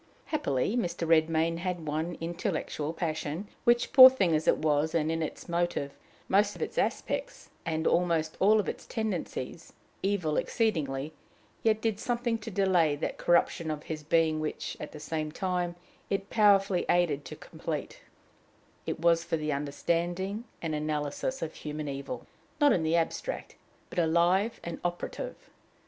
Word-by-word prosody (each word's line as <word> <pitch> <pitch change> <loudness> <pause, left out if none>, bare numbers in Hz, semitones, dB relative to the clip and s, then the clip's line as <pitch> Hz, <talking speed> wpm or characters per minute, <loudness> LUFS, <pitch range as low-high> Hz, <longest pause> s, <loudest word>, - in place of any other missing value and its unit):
Happily, 210 - 0
Mr. 175 -7 -1
Redmain 165 +1 +3
had 175 -2 -3
one 160 +3 -2
intellectual 165 -3 -3
passion, 160 +2 -3 0.2
which, 240 0 +3
poor 260 -1 +12
thing 195 -10 +1
as 155 +1 -1
it - - +5
was, 155 +1 +1
and 160 -1 +1
in 165 0 -1
its 155 - -5
motive, 170 -5 -1 0.4
most 205 +2 +3
of - - -10
its - - -3
aspects, - - -2 0.2
and 160 0 -1
almost 165 -3 +2
all 215 +3 +5
its - - -6
tendencies, 190 - -4 0.3
evil 185 -6 0
exceedingly, 155 - 0 0.5
yet 220 -1 +2
did 220 -2 0
something 235 -1 -1
to 220 +1 -7
delay 180 -6 +3
that 145 - -4
corruption 170 -1 +2
of 150 -1 -3
his 155 -1 -5
being 160 0 +2
which, 155 -1 -4
at 150 - -6
the 150 - -9
same 155 0 -3
time, 180 0 -1 0.3
it 195 0 -2
powerfully 200 -4 +4
aided 165 -5 +2
to - - -7
complete: - - -6 0.9
it - - -2
was 170 0 +3
for 165 - -1
the 155 -1 -1
understanding 175 +8 -1 0.2
and 160 -2 -1
analysis 150 - -2
of 160 - -4
human 150 0 -5
evil 140 - -5 0.3
not 290 -2 +6
in 175 - +1
the 160 +1 +1
abstract, 170 - -2 0.4
but - - -1
alive 175 +6 +2
and 170 -1 -5
operative. 175 - -5
170 Hz, 155 wpm, -29 LUFS, 155-195 Hz, 0.9 s, poor